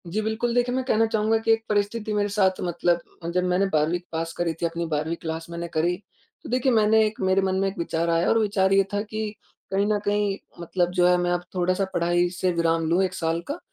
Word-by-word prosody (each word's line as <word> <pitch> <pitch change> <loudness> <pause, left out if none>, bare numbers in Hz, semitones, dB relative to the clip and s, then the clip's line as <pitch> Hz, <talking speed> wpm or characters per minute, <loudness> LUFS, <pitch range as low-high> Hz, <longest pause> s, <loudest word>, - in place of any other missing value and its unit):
जी 200 +6 -1
बिल्कुल। 220 +2 -1
देखिए, 245 0 +2
मैं 260 - 0
कहना 225 -3 +3
चाहूँगा 220 0 +1
कि 225 0 +1
एक 225 0 -1
परिस्थिति 210 +1 -1
मेरे 205 0 +1
साथ 190 -2 +1
मतलब 175 0 0 0.3
जब 180 0 +1
मैंने 180 +2 +2
12वीं 155 +3 +2
पास 165 0 -3
करी 170 -1 -1
थी - - +1
अपनी 170 0 -2
12वीं 155 +3 -1
क्लास 160 0 -4
मैंने 170 0 -5
करी 170 +3 +1 0.5
तो - - -8
देखिए 255 +2 +2
मैंने 220 -1 +4
एक 215 0 -4
मेरे 190 0 +3
मन 190 0 0
में 195 - +1
एक 195 - -5
विचार 170 0 -1
आया 165 +1 +2
और 225 - +4
विचार 200 -3 +2
ये 195 0 +5
था 205 - +1
कि 215 +1 -6 0.5
कहीं 195 +1 +2
न 210 -1 +1
कहीं 205 -1 +1 0.2
मतलब 175 +1 -1
जो 180 -1 +2
है 180 0 +4
मैं 175 0 0
अब 175 0 -1
थोड़ा-सा 185 +2 +1
पढ़ाई 175 0 +2
से 180 +1 -1
विराम 165 -1 +1
लूँ 175 +3 +3
1 185 -1 -1
साल 165 0 -1
का। 290 +5 -4
185 Hz, 235 wpm, -25 LUFS, 170-210 Hz, 0.5 s, ये